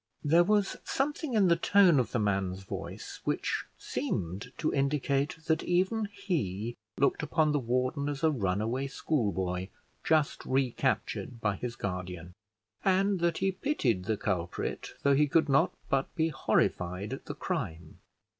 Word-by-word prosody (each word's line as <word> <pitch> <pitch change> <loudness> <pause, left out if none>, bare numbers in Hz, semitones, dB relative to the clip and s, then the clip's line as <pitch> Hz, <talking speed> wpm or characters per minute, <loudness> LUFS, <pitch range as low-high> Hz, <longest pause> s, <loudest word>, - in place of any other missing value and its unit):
There 165 +4 +5
was 205 +1 +2
something 290 -1 -1
in 200 -3 +5
the 170 - +5
tone 175 -3 +5
of 120 -3 0
the - - 0
man's 95 -3 0
voice - - -7
which - - -1
seemed 95 +8 -3
to 155 - 0
indicate 140 +1 +1
that 160 0 +2
even 190 +5 +1
he 120 - -3 0.2
looked 140 +3 +2
upon 155 0 +2
the 145 - +2
warden 130 +4 0
as 145 0 -4
a 160 - +5
runaway 115 +3 -1
schoolboy, 95 - -1 0.4
just 155 -3 +2
recaptured 130 -2 -1
by 105 -3 0
his 120 +4 -5
guardian, 90 -3 -5 0.5
and 195 0 +3
that 170 -1 +1
he 195 - +1
pitied 140 - 0
the 110 +1 0
culprit, 95 -7 -3
though 140 - +5
he 150 +2 +4
could 160 +2 +3
not 140 -1 +4 0.2
but 135 0 0
be 165 -2 +2
horrified 90 - 0
at - - -7
the - - -5
crime. 80 0 -4
135 Hz, 150 wpm, -30 LUFS, 100-165 Hz, 0.5 s, There